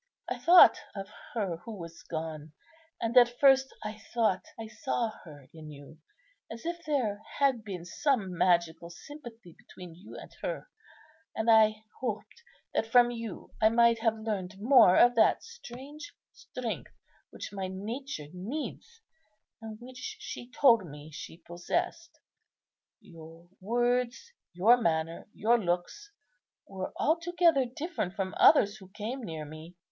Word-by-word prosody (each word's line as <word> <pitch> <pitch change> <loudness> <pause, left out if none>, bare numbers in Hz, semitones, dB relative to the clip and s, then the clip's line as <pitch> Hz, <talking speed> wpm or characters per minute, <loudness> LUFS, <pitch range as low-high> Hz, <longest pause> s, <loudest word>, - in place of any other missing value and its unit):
I - - -4
thought 355 +1 +8 0.2
of 195 0 -6 0.3
her 195 -7 -1
who 210 +5 -9
was 170 -2 -9
gone; 155 -1 -6 0.5
and 230 +1 -2
at 240 -1 +5
first 270 -1 +5
I 215 0 -6 0.2
thought 220 -5 +1
I 225 - -5
saw 230 0 -2
her 145 -5 -13
in 155 -1 -11
you, 145 +1 -13 0.5
as 230 +5 -9
if 340 0 -4
there 230 -9 0 0.2
had 270 -5 +2
been 185 -5 -7
some 205 - -1
magical 170 -1 +1
sympathy 230 - -12
between 180 -2 -13
you 180 +6 -12
and - - -11
her; - - -4 0.7
and 225 +1 +2
I 215 -1 +5 0.2
hoped 230 - -5 0.3
that 225 - 0
from 240 +1 +5
you 230 -4 -7
I 220 - +6
might 235 0 +4
have 225 -1 +1
learned 205 -4 -4
more 230 -5 +6
of 245 0 +6
that 220 - +4
strange 305 - -10 0.2
strength - - -6 0.4
which - - -8
my 195 -2 -3
nature 210 - -6
needs, 295 - -6 0.6
and 220 -1 -8
which 250 +1 -8
she 240 - -8
told 245 -5 +5
me 150 -1 -11
she 155 +1 -9
possessed. 330 - -4 0.8
Your 165 0 -14
words, 245 - 0 0.2
your 210 +8 +5
manner, 165 -6 -1
your 235 +2 +2
looks 180 - -3 0.6
were 190 -1 -6
altogether 330 -3 +2
different 250 - -4
from 190 -3 -3
others 215 -8 +5
who 190 -3 -15
came 220 +6 -5
near 160 -6 -6
me. 155 +3 -11
220 Hz, 140 wpm, -29 LUFS, 175-250 Hz, 0.8 s, thought